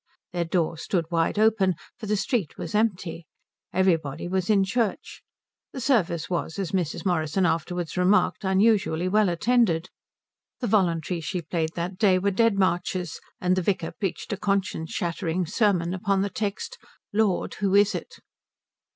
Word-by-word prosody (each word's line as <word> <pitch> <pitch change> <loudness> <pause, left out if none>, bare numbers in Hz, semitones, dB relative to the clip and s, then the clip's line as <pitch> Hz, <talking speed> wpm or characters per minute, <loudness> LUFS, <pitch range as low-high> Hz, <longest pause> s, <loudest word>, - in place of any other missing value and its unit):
Their 175 -1 0
door 165 -1 0
stood 170 +1 -1
wide 165 +3 +1
open, 210 -4 +3 0.2
for 220 - -6
the 210 - +1
street 200 - -1
was - - -6
empty. 185 -6 -1 0.4
Everybody 170 -5 +1
was 185 +1 -1
in 200 -2 +5
church. 215 +1 -2 0.5
The 265 - -5
service 205 - +1
was, 175 -1 -3
as 195 -4 -3
Mrs. 180 -1 -2
Morrison 175 0 +1
afterwards 170 0 -1
remarked, 185 +4 +2
unusually 190 -3 +2
well 210 +1 +3
attended. 185 -2 +2 0.7
The 250 - -2
voluntaries 170 -6 +1
she 180 0 -3
played 160 0 -2
that 180 +2 -4
day 195 -4 +5
were 200 +2 +1
Dead 225 +1 +3
Marches, 180 -1 0 0.2
and 180 0 +2
the 185 - +1
vicar 180 -3 -1
preached 195 +1 -4
a - - -3
conscience 195 -5 -1
shattering 170 0 -2
sermon 180 -2 +1
upon 195 0 +1
the 200 - -2
text 205 0 -4 0.3
"Lord, 210 -3 +1
who 200 -2 +1
is 205 0 +5
it?" - - -6
185 Hz, 155 wpm, -25 LUFS, 170-205 Hz, 0.7 s, in